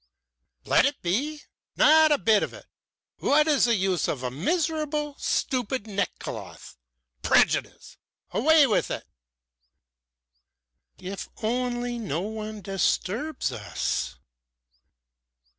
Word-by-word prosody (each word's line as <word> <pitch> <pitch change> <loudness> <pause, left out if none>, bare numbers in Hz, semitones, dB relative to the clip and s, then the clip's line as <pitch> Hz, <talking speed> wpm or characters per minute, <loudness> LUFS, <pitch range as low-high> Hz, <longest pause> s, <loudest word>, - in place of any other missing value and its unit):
"Let - - +4
it 285 - -4
be? 280 - -1 0.3
Not 315 0 +6
a 295 - +5
bit 220 -5 +3
of - - -4
it! - - -13 0.5
What 300 +2 +3
is 295 -5 +4
the 235 -1 +3
use 190 -3 0
of 130 -3 -3
a 125 - -2
miserable, 300 - -1
stupid 255 -3 -1
neckcloth? 200 -4 -5 0.5
Prejudice! - - +1 0.3
Away 310 +4 +5
with 225 - +1
it!" - - -4 1.9
"If 190 +1 -7
only 245 +1 -1
no 175 -7 -2
one 215 +1 -6
disturbs 195 - -1
us!" 110 -4 -3
240 Hz, 105 wpm, -26 LUFS, 195-295 Hz, 1.9 s, Not